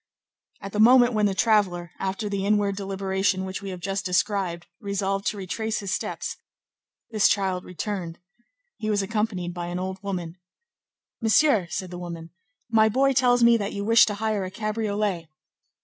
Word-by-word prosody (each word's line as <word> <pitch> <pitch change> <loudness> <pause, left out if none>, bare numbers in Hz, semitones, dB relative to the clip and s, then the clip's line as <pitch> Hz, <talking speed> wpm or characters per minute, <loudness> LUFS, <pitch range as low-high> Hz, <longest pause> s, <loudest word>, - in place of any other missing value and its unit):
At 195 - -7
the 210 - -3
moment 245 +2 +6
when 210 -1 +3
the 195 - -2
traveller, 190 -6 +2
after 195 +3 -2
the 200 -1 -2
inward 205 -1 +1
deliberation 195 -1 -1
which 190 +1 -5
we 200 - -6
have 185 -1 -6
just 195 +2 -3
described, 180 -2 0
resolved 195 0 -2
to 210 - -1
retrace 215 +4 -3
his 200 -1 -3
steps, - - -4 0.7
this 215 -2 +4
child 190 -3 0
returned. 180 -2 -5 0.6
He 215 - -3
was 205 -2 +1
accompanied 200 -4 -2
by 175 -1 -5
an 175 +1 -4
old 190 +1 -4
woman. 180 -3 -5 0.8
"Monsieur," 225 - +3
said 185 0 -4
the 175 - -6
woman, 170 -2 -7 0.4
"my 220 -2 +4
boy 270 +4 +2
tells 245 -1 +3
me 235 0 +6
that 205 -2 -3
you 200 0 -4
wish 230 +1 +6
to 210 - -2
hire 215 -1 -1
a 185 - -4
cabriolet." 210 -4 -2
200 Hz, 170 wpm, -25 LUFS, 185-215 Hz, 0.8 s, moment